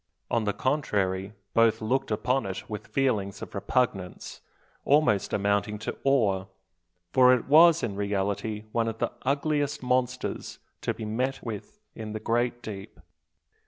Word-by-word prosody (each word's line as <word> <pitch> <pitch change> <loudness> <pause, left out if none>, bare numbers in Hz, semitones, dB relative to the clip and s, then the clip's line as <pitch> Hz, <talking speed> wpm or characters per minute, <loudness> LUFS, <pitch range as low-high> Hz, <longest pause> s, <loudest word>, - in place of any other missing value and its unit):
On 115 -2 +1
the 105 - +2
contrary, 100 -6 0 0.2
both 115 -1 +4
looked 125 +5 0
upon 120 +3 0
it 95 - -6
with 105 -1 -6
feelings 105 -7 0
of - - -9
repugnance, 100 -3 -2 0.4
almost 135 -10 +3
amounting 100 +1 0
to 105 - -5
awe; 105 -9 +2 0.7
for 125 -1 +7
it 120 - -4
was 160 +3 +6
in 105 -5 -2
reality 100 +1 -2
one 115 0 +1
of 115 0 -3
the - - -1
ugliest 145 +1 0
monsters 125 0 -1 0.2
to - - -1
be 110 - -6
met 125 +5 -2
with 115 - -7 0.2
in 110 -1 -6
the 110 - -3
great 120 +2 0
deep. 100 -3 -8
115 Hz, 145 wpm, -27 LUFS, 100-130 Hz, 0.7 s, for